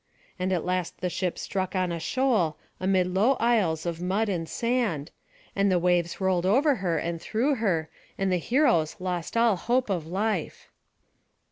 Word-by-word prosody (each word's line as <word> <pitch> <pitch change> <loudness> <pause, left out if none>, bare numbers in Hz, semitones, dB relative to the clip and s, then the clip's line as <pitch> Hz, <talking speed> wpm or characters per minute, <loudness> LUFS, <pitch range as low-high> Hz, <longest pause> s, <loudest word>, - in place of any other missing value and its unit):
And 185 +1 -1
at 180 -4 0
last 180 -1 -2
the 180 -1 -2
ship 180 0 -2
struck 190 -1 -3
on 185 -1 0
a 170 - -3
shoal, 210 - +1 0.2
amid 185 -1 +2
low 215 +8 +4
isles 200 -11 +1
of 170 -1 -3
mud 200 +5 0
and 165 -4 -2
sand, 230 - -1 0.4
and 200 0 +2
the 180 - +3
waves 175 -1 +1
rolled 185 -2 +1
over 270 +7 +3
her 175 -4 -1
and 170 -1 -3
through 245 +7 0
her, 175 -8 0 0.3
and 195 -1 0
the 180 - +3
heroes 175 - +2
lost 180 +2 -3
all 230 -3 +4
hope 240 +3 0
of 170 -5 -2
life. 195 0 -2
185 Hz, 170 wpm, -26 LUFS, 170-220 Hz, 0.4 s, low